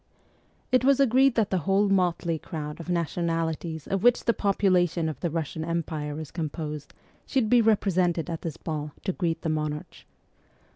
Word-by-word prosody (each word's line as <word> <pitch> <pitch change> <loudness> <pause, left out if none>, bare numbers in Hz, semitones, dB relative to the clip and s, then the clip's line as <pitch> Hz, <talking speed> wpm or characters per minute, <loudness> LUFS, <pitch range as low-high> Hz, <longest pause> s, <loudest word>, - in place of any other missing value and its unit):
It 255 -1 +4
was 275 +1 +4
agreed 265 0 +4
that 220 -3 +1
the 190 - +2
whole 195 +5 +2
motley 175 -4 +1
crowd 150 -1 -6
of 170 - -8
nationalities 165 -2 -1
of 195 -1 -1
which 245 +2 +4
the 235 - +4
population 185 -5 +2
of 155 - -4
the 175 - -1
Russian 160 0 -3
Empire 155 -3 -3
is 155 -3 -7
composed 150 -2 -5 0.3
should 250 -6 +1
be 245 -1 +6
represented 185 -6 +2
at 165 -2 -4
this 165 -3 -5
ball 150 -2 -4
to 190 - -1
greet 170 -4 -2
the 160 - 0
monarch. 150 -1 -4
170 Hz, 165 wpm, -26 LUFS, 160-195 Hz, 0.3 s, be